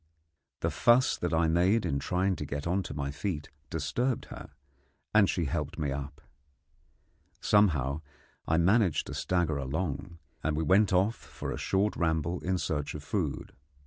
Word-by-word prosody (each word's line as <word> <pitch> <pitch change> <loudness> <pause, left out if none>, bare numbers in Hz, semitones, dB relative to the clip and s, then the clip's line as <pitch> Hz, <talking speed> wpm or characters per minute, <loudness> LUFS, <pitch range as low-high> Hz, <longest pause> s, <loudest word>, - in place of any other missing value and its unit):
The - - 0
fuss 120 +2 +4
that 90 - -2
I 80 0 +3
made 90 +7 +3
in 70 - 0
trying 95 +4 0
to 75 - -4
get 70 +1 -4
on 90 +3 +1
to 80 - -7
my 70 -1 -2
feet 75 0 -4 0.2
disturbed 125 0 -1
her, - - -8 0.6
and 105 -2 +5
she 85 - 0
helped 75 -1 -3
me 75 -3 -1
up. 70 +2 -6 1.2
Somehow 80 -9 +2 0.5
I 80 - +2
managed 95 0 +3
to - - -7
stagger 85 -5 0
along, 75 +4 -3 0.3
and 80 -1 0
we 80 - +1
went 95 +6 +4
off 95 +4 +3
for - - -7
a - - -3
short 100 +2 +1
ramble 80 +1 0
in 95 +1 -1
search 75 -5 -2
of 75 - -7
food. 80 -4 -3
85 Hz, 165 wpm, -29 LUFS, 75-95 Hz, 1.2 s, and